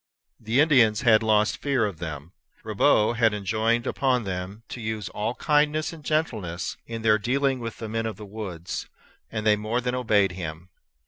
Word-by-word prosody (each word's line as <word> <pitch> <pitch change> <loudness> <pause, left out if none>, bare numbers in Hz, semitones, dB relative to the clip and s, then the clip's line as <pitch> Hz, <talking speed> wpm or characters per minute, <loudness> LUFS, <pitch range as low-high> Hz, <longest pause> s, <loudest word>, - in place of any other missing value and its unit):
The 115 +4 0
Indians 125 -9 +4
had 115 -3 +5
lost 110 -1 +2
fear 135 -5 +1
of 100 -6 -5
them. 75 -1 -6 0.3
Ribaut 110 +2 +2
had 115 -3 +3
enjoined 110 +4 0
upon 130 -3 +1
them 95 +2 -5
to 120 - -7
use 110 -3 -3
all 110 +4 -3
kindness 150 +1 +1
and 160 -2 -12
gentleness 105 - -2
in 115 -1 -6
their 110 -1 +4
dealing 135 +4 0
with 115 -2 -6
the 115 - -6
men 115 +1 -2
of 110 - -4
the 105 - -9
woods; 95 -5 -6 0.4
and 110 -1 -3
they 105 -1 +5
more 110 +3 -1
than 125 0 -2
obeyed 105 -6 +2
him. 85 -1 -7
110 Hz, 180 wpm, -25 LUFS, 100-125 Hz, 0.4 s, had